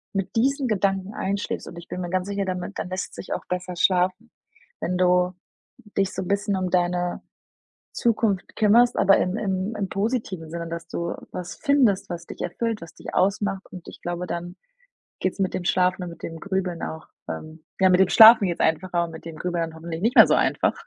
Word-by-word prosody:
mit 195 -2 -2
diesen 270 +4 +2
Gedanken 195 -2 0
einschläfst. 200 +1 -3
Und 170 - -10
ich 170 - -10
bin 180 - -5
mir 175 - -4
ganz 185 +1 -1
sicher 200 -1 -2
damit, 185 +1 -4
dann - - -4
lässt's 185 +1 -4
sich - - -5
auch - - -5
besser 180 0 -3
schlafen, 185 +5 +1 0.5
wenn 180 +1 -1
du 180 0 +3 0.6
dich 195 -1 +2
so - - -3
'n - - -7
bisschen 200 +1 0
um 185 -1 -1
deine 175 0 0 0.7
Zukunft 220 -4 0
kümmerst, 235 +3 +5
aber 195 - +6
im 180 +2 0
im 195 0 -2
im 200 -2 -2
positiven 200 -6 -2
Sinne, 170 0 -5
dass 165 0 -6
du 170 0 -3 0.2
was 180 -1 -6
findest, 265 -10 +2
was 170 -1 -6
dich - - -10
erfüllt, 225 +4 -2
was 165 -2 -10
dich - - -9
ausmacht. 195 0 +1
Und 180 -2 -10
ich - - -11
glaube, 175 +1 -3
dann 175 +1 -5 0.7
geht's 185 - -1
mit 190 -2 0
dem 175 - -3
Schlafen 180 +1 +2
und 175 - -5
mit 170 - -14
dem 165 0 -6
Grübeln 190 -2 -2
auch 160 0 -6 0.2
ähm, 155 0 -7 0.2
ja, 190 -1 +5
mit 180 0 +4
dem 190 - +4
Schlafen 220 -2 +9
geht's 175 - -3
einfacher 170 +2 +1
und 165 - -9
mit 160 - -10
dem 165 -2 -8
Grübeln 175 -2 -1
dann 160 - -13
hoffentlich 165 0 -6
nicht 230 +6 +1
mehr - - +10
so - - +3
einfach. - - +2
185 Hz, 210 wpm, -24 LUFS, 175-200 Hz, 0.7 s, mehr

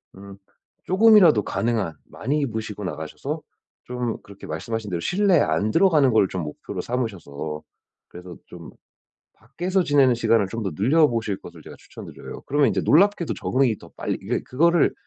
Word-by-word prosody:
음 100 0 -12 0.5
쪼금이라도 185 - +5
가능한 110 -9 -2
많이 145 +5 -3
입으시고 110 -6 -4
나가셔서 115 - -5 0.4
좀 125 -2 -4
그렇게 100 -1 -13
말씀하신 105 +7 -4
대로 85 - -2
실내에 190 - +2
안 85 +8 0
들어가는 155 - +4
걸 100 -3 +4
좀 90 -3 -4
목표로 75 - -6
삼으셔서 85 - -5 0.5
그래서 90 0 -11
좀 85 -2 -12 0.6
밖에서 175 - -2
지내는 140 -5 +3
시간을 115 -3 +2
좀 115 +3 -5
더 95 - -2
늘려보실 115 -4 +2
것을 - - -12
제가 - - -12
추천드려요. - - -11
그러면 145 0 +3
이제 - - -1
놀랍게도 180 +1 +3
적응이 130 -5 0
더 - - -15
빨리 - - -3
이게 - - -2
그거를 170 +5 +2
115 Hz, 375 characters per minute, -23 LUFS, 100-150 Hz, 0.6 s, 쪼금이라도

